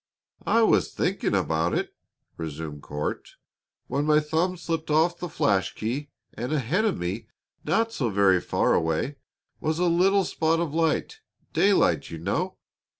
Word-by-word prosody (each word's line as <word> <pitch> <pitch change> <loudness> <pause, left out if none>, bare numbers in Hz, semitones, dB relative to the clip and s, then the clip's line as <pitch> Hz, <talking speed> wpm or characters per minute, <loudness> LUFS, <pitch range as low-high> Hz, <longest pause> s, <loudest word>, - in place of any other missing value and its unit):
"I 230 - +4
was - - +3
thinking 185 - 0
about 85 -2 +1
it," - - -2 0.4
resumed 80 -2 -6
Court, 75 +1 -5 0.5
"when 145 +1 -1
my 150 0 +5
thumb 160 +4 0
slipped 165 -2 -3
off 165 +3 +2
the 175 - -4
flash 100 -9 +1
key, 130 +7 -3 0.2
and 120 +5 -4
ahead 155 - +1
of 210 - +1
me, 95 +6 -4 0.4
not 225 +8 +1
so 125 - -1
very 95 -3 +4
far - - +1
away, 80 - 0 0.4
was 155 0 -1
a 180 - +1
little 190 +3 +4
spot 165 -1 +1
of 165 -4 -2
light 165 - 0 0.3
daylight, 185 - +3
you 80 - -6
know. 130 - -2
150 Hz, 150 wpm, -26 LUFS, -, 0.5 s, my